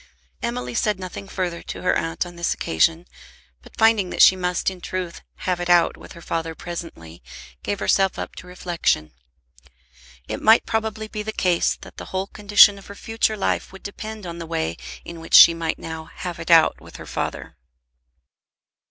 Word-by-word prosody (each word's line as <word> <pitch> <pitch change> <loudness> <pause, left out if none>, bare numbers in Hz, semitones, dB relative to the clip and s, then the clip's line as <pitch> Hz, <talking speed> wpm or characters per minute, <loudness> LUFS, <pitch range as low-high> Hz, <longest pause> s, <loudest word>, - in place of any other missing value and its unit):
Emily 125 +1 -3
said 210 - 0
nothing 185 +1 -7
further 180 -3 -3
to - - -8
her 185 - +2
aunt 165 +2 -1
on 175 0 -10
that 170 0 -1
occasion, 160 - +1 0.6
but - - -18
finding 220 -4 +4
that - - +4
she 190 - +8
must 180 0 -1
in 185 -1 -11
truth 180 -2 -5 0.2
"have 180 -1 0
it 175 0 -3
out" 175 -1 +4
with - - -13
her 170 -2 -13
father 165 -1 -3
presently, 160 - -8 0.4
gave 205 - -3
herself 195 -1 +2
up - - -6
to 180 - -10
reflection. 170 - -1 1.1
It - - -5
might 220 +2 +5
probably 220 -1 -2
be 210 0 -5
the 215 +1 -4
case 180 -5 +1
that - - -13
the - - -7
whole 190 0 -3
condition 205 0 +5
of 195 - -15
her 200 - -10
future 225 0 -1
life 200 - -1
would 195 - -13
depend 215 0 -7
on 170 -1 -7
the 165 - -6
way 80 - -2 0.3
in 170 -1 -8
which 165 - 0
she 170 - +10
might 165 -1 -3
now 160 -1 -7
"have 175 0 -7
it 165 - -7
out" 165 -2 +5
with - - -14
her - - -9
father. - - -5
180 Hz, 185 wpm, -22 LUFS, 165-200 Hz, 1.1 s, she